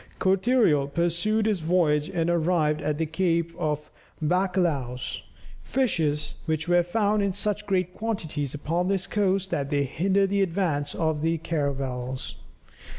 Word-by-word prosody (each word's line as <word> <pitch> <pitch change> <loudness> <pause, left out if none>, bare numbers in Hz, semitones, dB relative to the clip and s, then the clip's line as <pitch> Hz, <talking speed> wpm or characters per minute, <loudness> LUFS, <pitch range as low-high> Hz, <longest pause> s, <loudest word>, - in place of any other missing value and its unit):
Cortereal 190 - +3
pursued 175 +7 +1
his 210 -4 +1
voyage 155 -3 +2
and 165 -1 -1
arrived 165 -3 +1
at 150 0 -1
the 160 - 0
Cape 170 0 0
of 150 -3 -2 0.3
Bacalhaos, 165 -7 0 0.4
"fishes 160 - 0
which 160 +1 -1
are 175 0 +5
found 205 +4 +1
in 200 -1 0
such 210 +1 -2
great 185 -2 0
quantities 160 - -3
upon 165 +5 -1
this 195 -1 0
coast 195 -2 0
that 140 -1 -1
they 145 -1 +1
hinder 190 +8 +1
the 200 +1 +1
advance 165 -6 0
of 160 -2 0
the 165 +1 +1
caravels." 135 -5 -3
170 Hz, 140 wpm, -26 LUFS, 150-190 Hz, 0.4 s, are